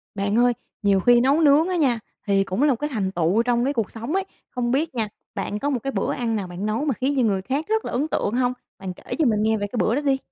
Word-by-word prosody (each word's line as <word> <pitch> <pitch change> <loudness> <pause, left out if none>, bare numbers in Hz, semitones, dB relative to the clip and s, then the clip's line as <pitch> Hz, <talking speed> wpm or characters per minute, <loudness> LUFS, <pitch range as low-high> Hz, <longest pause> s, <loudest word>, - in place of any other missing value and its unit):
Bạn 200 +2 0
ơi, 245 0 +4 0.3
nhiều 200 -2 +3
khi 240 +4 +5
nấu 275 +6 +3
nướng 300 +3 +5
á 365 - 0
nha, 260 -9 +2 0.3
thì 195 -1 +3
cũng 195 +8 -1
là 300 - +5
một - - -2
cái 295 - -2
thành 195 -4 -1
tựu 175 +6 +2
trong 240 0 +1
cái 280 - +1
cuộc 225 -7 -2
sống 230 +7 -5
ấy. 385 0 0 0.2
Không 240 -1 -2
biết 295 +2 0
nha, 225 -3 0 0.3
bạn 210 - -3
có 285 - -1
một 265 -4 0
cái 275 - -2
bữa - - -1
ăn 230 -2 -1
nào 200 -3 -3
bạn 180 +3 -5
nấu 220 +7 -1
mà 285 - +1
khiến 265 +4 -1
cho - - +4
người 200 -4 +1
khác 275 - -2
rất 440 +1 0
là - - -4
ấn 275 +5 0
tượng 210 - -1
hông? 250 0 +1 0.3
Bạn 190 -1 -5
kể - - -7
cho 315 - +4
mình 215 -4 +2
nghe 220 0 +2
về 205 -1 -2
cái 240 - -6
bữa 225 - +2
đó 290 - 0
đi. 275 -2 +2
240 Hz, 305 wpm, -23 LUFS, 210-280 Hz, 0.3 s, khi